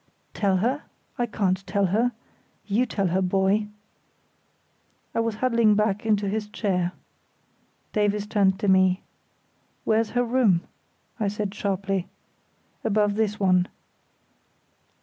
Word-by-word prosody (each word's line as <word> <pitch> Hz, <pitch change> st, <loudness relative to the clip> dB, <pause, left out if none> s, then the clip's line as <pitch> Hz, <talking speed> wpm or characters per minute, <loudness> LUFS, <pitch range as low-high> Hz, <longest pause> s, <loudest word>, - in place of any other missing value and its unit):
"Tell 195 Hz, -3 st, +1 dB
her? 250 Hz, +10 st, 0 dB, 0.3 s
I 240 Hz, -, +1 dB
can't 195 Hz, -4 st, 0 dB
tell 200 Hz, +1 st, +1 dB
her. 240 Hz, +4 st, +2 dB, 0.5 s
You 225 Hz, +5 st, +1 dB
tell 195 Hz, -3 st, 0 dB
her, 185 Hz, +3 st, +1 dB
boy." 195 Hz, +3 st, +2 dB, 1.5 s
He -, -, 0 dB
was 230 Hz, -1 st, 0 dB
huddling 230 Hz, -2 st, +3 dB
back 210 Hz, 0 st, 0 dB
into 205 Hz, -2 st, +2 dB
his 210 Hz, +1 st, -2 dB
chair. 185 Hz, -4 st, -1 dB, 1.0 s
Davies 210 Hz, -1 st, +1 dB
turned 200 Hz, -3 st, +2 dB
to 205 Hz, -, 0 dB
me. 190 Hz, -1 st, +4 dB, 0.8 s
"Where's 220 Hz, 0 st, +2 dB
her 245 Hz, -, +4 dB
room?" 230 Hz, -8 st, +3 dB, 0.6 s
I 210 Hz, -, +1 dB
said, 205 Hz, -1 st, -3 dB
sharply. 195 Hz, -2 st, -2 dB, 0.8 s
"Above 210 Hz, -1 st, +2 dB
this 210 Hz, 0 st, -1 dB
one." 185 Hz, -2 st, +3 dB
205 Hz, 120 wpm, -25 LUFS, 190-220 Hz, 1.5 s, me